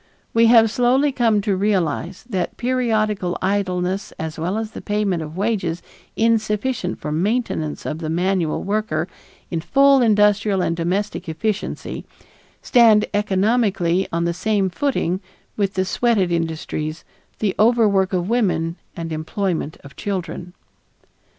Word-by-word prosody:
We 230 Hz, 0 st, +5 dB
have 225 Hz, -2 st, +6 dB
slowly 255 Hz, +5 st, +3 dB
come 230 Hz, -5 st, +2 dB
to 200 Hz, -1 st, 0 dB
realize 185 Hz, -1 st, -1 dB
that 190 Hz, -7 st, -3 dB
periodical 215 Hz, -7 st, 0 dB
idleness 185 Hz, 0 st, -1 dB
as 160 Hz, 0 st, -6 dB
well 180 Hz, +6 st, -1 dB
as 220 Hz, -1 st, -3 dB
the -, -, -8 dB
payment 205 Hz, -5 st, -1 dB
of 155 Hz, +2 st, -7 dB
wages 190 Hz, -5 st, -1 dB, 0.3 s
insufficient 225 Hz, -2 st, 0 dB
for 150 Hz, -, -4 dB
maintenance 175 Hz, -2 st, -1 dB
of 155 Hz, -, -3 dB
the 160 Hz, -2 st, -4 dB
manual 175 Hz, -1 st, 0 dB
worker 200 Hz, -6 st, -1 dB, 0.4 s
in 165 Hz, -2 st, -1 dB
full 275 Hz, +6 st, +4 dB
industrial 210 Hz, -3 st, +3 dB
and 165 Hz, -, 0 dB
domestic 180 Hz, +2 st, -2 dB
efficiency, 210 Hz, +6 st, -3 dB, 0.6 s
stand 225 Hz, -4 st, +5 dB
economically 195 Hz, -3 st, +1 dB
on 170 Hz, +1 st, 0 dB
the 170 Hz, -, 0 dB
same 195 Hz, +1 st, 0 dB
footing 190 Hz, -7 st, -1 dB, 0.3 s
with 200 Hz, -2 st, -1 dB
the 185 Hz, 0 st, +1 dB
"sweated" 195 Hz, -2 st, +1 dB
industries, 160 Hz, -1 st, -3 dB, 0.3 s
the 205 Hz, -3 st, 0 dB
overwork 210 Hz, -4 st, +4 dB
of 180 Hz, -2 st, -1 dB
women, 180 Hz, -7 st, 0 dB, 0.2 s
and 165 Hz, -1 st, -4 dB
employment 160 Hz, 0 st, -2 dB
of 140 Hz, -1 st, -13 dB
children. 180 Hz, -2 st, -5 dB
195 Hz, 130 wpm, -21 LUFS, 170-220 Hz, 0.6 s, have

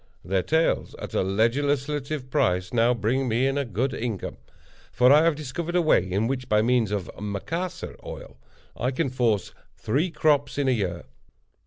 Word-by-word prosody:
Their 95 Hz, +1 st, +1 dB
tails, 160 Hz, -, 0 dB
at -, -, -8 dB
a -, -, +2 dB
legislative 135 Hz, +6 st, 0 dB
price, 90 Hz, 0 st, +1 dB
now 120 Hz, 0 st, +4 dB
bring 120 Hz, +5 st, 0 dB
me 120 Hz, +3 st, +1 dB
in 135 Hz, 0 st, +1 dB
a 140 Hz, -, +1 dB
good 125 Hz, +3 st, -2 dB
income; 110 Hz, -6 st, -4 dB, 0.5 s
for 125 Hz, +1 st, +5 dB
I 150 Hz, +2 st, +6 dB
have 165 Hz, -2 st, +3 dB
discovered 155 Hz, +4 st, -4 dB
a 180 Hz, -, +4 dB
way, 95 Hz, -, +3 dB
in 100 Hz, +4 st, +1 dB
which, 130 Hz, +1 st, -3 dB
by 105 Hz, 0 st, +3 dB
means 120 Hz, -2 st, +2 dB
of 100 Hz, -3 st, -3 dB
Macassar 105 Hz, -, -4 dB
oil, -, -, -9 dB, 0.4 s
I 125 Hz, -, -1 dB
can 135 Hz, +1 st, -1 dB
force 115 Hz, -6 st, 0 dB, 0.2 s
three 145 Hz, +11 st, 0 dB
crops 150 Hz, -3 st, +1 dB
in 140 Hz, -2 st, +1 dB
a -, -, +4 dB
year. 100 Hz, -8 st, -1 dB
125 Hz, 175 wpm, -25 LUFS, 105-145 Hz, 0.5 s, I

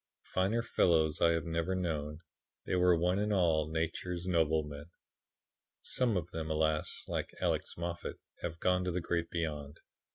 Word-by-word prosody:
Finer 100 Hz, +5 st, +2 dB
fellows 80 Hz, -7 st, +2 dB
I 85 Hz, -, +6 dB
have 80 Hz, -2 st, -1 dB
never 85 Hz, +2 st, -1 dB
known; 75 Hz, -4 st, -2 dB, 0.4 s
they -, -, -2 dB
were 90 Hz, -1 st, +5 dB
one 90 Hz, +3 st, +2 dB
and 105 Hz, +1 st, 0 dB
all 80 Hz, -6 st, +3 dB
Nature's 85 Hz, +2 st, -2 dB
noblemen. 80 Hz, -3 st, 0 dB, 0.9 s
"Some 120 Hz, -6 st, +2 dB
of 85 Hz, 0 st, -4 dB
them, 80 Hz, -2 st, -4 dB
alas! 80 Hz, 0 st, 0 dB
like -, -, -3 dB
Alex -, -, -1 dB
Moffat, 85 Hz, 0 st, -4 dB, 0.2 s
have 85 Hz, -1 st, -4 dB
gone 90 Hz, 0 st, +2 dB
to 90 Hz, -, 0 dB
the 90 Hz, -, -1 dB
Great 85 Hz, -1 st, -1 dB
Beyond. 75 Hz, -4 st, -3 dB
85 Hz, 155 wpm, -33 LUFS, 80-90 Hz, 0.9 s, I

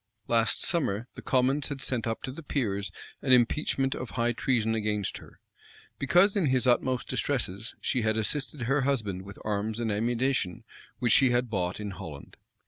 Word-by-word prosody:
Last 115 Hz, -1 st, +3 dB
summer, 120 Hz, -, 0 dB
the -, -, -9 dB
commons 135 Hz, +2 st, +1 dB
had 140 Hz, -2 st, -4 dB
sent 125 Hz, -3 st, -1 dB
up 115 Hz, -, -3 dB
to 130 Hz, -, -4 dB
the 145 Hz, -, -8 dB
peers 100 Hz, -10 st, -2 dB, 0.3 s
an 130 Hz, -, 0 dB
impeachment 135 Hz, +2 st, +3 dB
of 130 Hz, -, -5 dB
high 120 Hz, 0 st, 0 dB
treason 115 Hz, -2 st, +1 dB
against 105 Hz, -2 st, -1 dB
her; -, -, -15 dB, 0.6 s
because, 175 Hz, +9 st, +4 dB
in 190 Hz, -7 st, +2 dB
his 130 Hz, -1 st, +2 dB
utmost 125 Hz, +1 st, +2 dB
distresses, 115 Hz, -5 st, -1 dB
she 125 Hz, -, 0 dB
had 110 Hz, 0 st, +1 dB
assisted 135 Hz, +4 st, -2 dB
her 135 Hz, +4 st, +2 dB
husband 110 Hz, -9 st, -1 dB
with 100 Hz, +1 st, -11 dB
arms 105 Hz, +1 st, -1 dB
and 115 Hz, -2 st, -1 dB
ammunition 115 Hz, -2 st, 0 dB, 0.3 s
which 120 Hz, -, +2 dB
she 130 Hz, -, +6 dB
had 120 Hz, -1 st, 0 dB
bought 90 Hz, -2 st, -1 dB
in 105 Hz, -1 st, -4 dB
Holland. 85 Hz, -7 st, -9 dB
120 Hz, 175 wpm, -28 LUFS, 105-135 Hz, 0.6 s, she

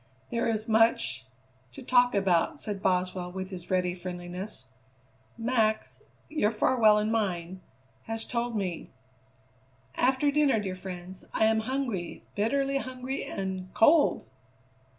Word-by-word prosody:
"There 235 Hz, 0 st, 0 dB
is 220 Hz, -1 st, -1 dB
much 220 Hz, -, +2 dB, 0.5 s
to -, -, -9 dB
talk 245 Hz, -2 st, +4 dB
about," 195 Hz, -, +2 dB
said 205 Hz, -3 st, -4 dB
Boswell 180 Hz, -1 st, 0 dB
with 190 Hz, +1 st, -6 dB
his 180 Hz, -1 st, -8 dB
ready 180 Hz, -1 st, +1 dB
friendliness; 180 Hz, -1 st, -6 dB, 0.7 s
"Max 225 Hz, -2 st, 0 dB, 0.2 s
your 300 Hz, -9 st, +1 dB
Farwell 215 Hz, -1 st, +4 dB
and 210 Hz, +1 st, 0 dB
mine 185 Hz, -4 st, -2 dB, 0.5 s
has 225 Hz, 0 st, -3 dB
told 240 Hz, -1 st, -2 dB
me 185 Hz, -5 st, -3 dB, 0.5 s
" 130 Hz, +1 st, -32 dB
"After 270 Hz, +2 st, +1 dB
dinner, 285 Hz, -5 st, +3 dB
dear 195 Hz, -3 st, -3 dB
friends. 185 Hz, 0 st, -8 dB
I -, -, +2 dB
am 220 Hz, 0 st, +3 dB
hungry, 235 Hz, -7 st, -3 dB
bitterly 275 Hz, +6 st, +1 dB
hungry 255 Hz, +1 st, -4 dB
and 190 Hz, -1 st, -4 dB
cold!" 295 Hz, +6 st, +4 dB
210 Hz, 130 wpm, -28 LUFS, 180-235 Hz, 0.7 s, talk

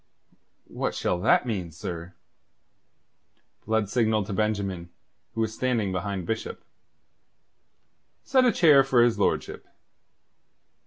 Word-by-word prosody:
"What -, -, -4 dB
shall 90 Hz, -, -1 dB
that 90 Hz, -, +3 dB
mean, 95 Hz, -8 st, -3 dB
sir?" 85 Hz, +2 st, -7 dB, 1.5 s
Blood 110 Hz, -2 st, +1 dB
signalled 110 Hz, -1 st, +1 dB
to 100 Hz, -, -5 dB
Benjamin, 100 Hz, -4 st, -2 dB, 0.5 s
who 115 Hz, -, -1 dB
was 110 Hz, -1 st, -1 dB
standing 115 Hz, -5 st, -1 dB
behind 95 Hz, 0 st, -3 dB
Bishop. 110 Hz, +5 st, -4 dB, 1.6 s
"Set 260 Hz, -1 st, +3 dB
a 250 Hz, -, +4 dB
chair 150 Hz, -8 st, +5 dB
for 130 Hz, -3 st, +3 dB
his 115 Hz, -3 st, +1 dB
lordship. -, -, -1 dB
110 Hz, 110 wpm, -26 LUFS, 95-120 Hz, 1.6 s, chair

